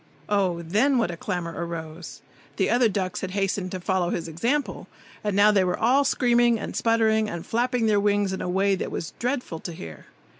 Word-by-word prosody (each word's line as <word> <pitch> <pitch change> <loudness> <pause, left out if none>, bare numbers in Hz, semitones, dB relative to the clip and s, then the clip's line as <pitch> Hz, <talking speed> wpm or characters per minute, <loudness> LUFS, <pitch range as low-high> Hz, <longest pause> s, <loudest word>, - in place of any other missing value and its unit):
Oh, 185 -5 +1
then, 225 +11 +2
what 230 -7 +1
a - - -5
clamour 170 -1 -4
arose! 165 -1 -6 0.3
The - - +1
other 240 -1 +4
ducks 190 -3 -2
had 190 - -3
hastened 195 -1 -1
to 185 - -5
follow 180 -1 0
his 170 -2 -3
example, 205 - -2 0.4
and 205 -2 -1
now 205 +1 +6
they 200 -2 +3
were 180 -1 0
all 260 +5 +3
screaming 240 -2 +3
and - - -6
sputtering 220 -1 +2
and 170 -3 -6
flapping 245 0 0
their 210 -2 +3
wings 205 -1 +1
in 190 - -4
a - - -3
way 195 +2 +2
that 190 - -2
was 165 - -5
dreadful 245 - -2
to 170 - -7
hear. 80 - -10
200 Hz, 200 wpm, -25 LUFS, 175-230 Hz, 0.4 s, now